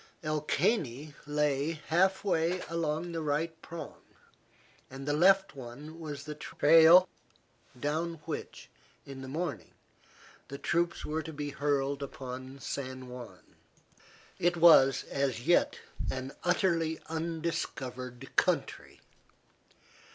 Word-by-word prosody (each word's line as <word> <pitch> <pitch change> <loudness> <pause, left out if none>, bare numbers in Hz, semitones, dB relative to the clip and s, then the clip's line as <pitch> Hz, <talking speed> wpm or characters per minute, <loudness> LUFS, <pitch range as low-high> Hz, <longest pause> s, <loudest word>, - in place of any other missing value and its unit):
El 155 -1 -1
Caney 150 - 0
lay 150 +1 +1 0.2
half 190 +4 +3
way 180 -2 +1
along 165 0 -2
the 165 -1 -3
right 160 +2 -2
prong, 170 0 -8 0.9
the 135 +2 -3
left 190 +3 +4
one 140 +6 -9
was 145 -3 -6
the 150 0 -6
trail 165 +4 +6 0.7
down 160 +5 -1
which, - - -6 0.4
in 135 -1 -8
the 130 - -7
morning, 140 - -4 0.7
the 140 - -7
troops 170 +3 0
were 155 +1 -2
to 160 - -7
be 145 -1 -4
hurled 140 0 0
upon 130 -1 -7
San 130 -1 -5
Juan. 120 -7 -11 0.8
It 175 0 +2
was 155 -6 +7
as 135 -3 -2
yet 175 - +3 0.3
an 130 +1 -4
utterly 170 -3 +1
undiscovered 140 -6 -4
country. - - 0
150 Hz, 110 wpm, -31 LUFS, 135-165 Hz, 0.9 s, was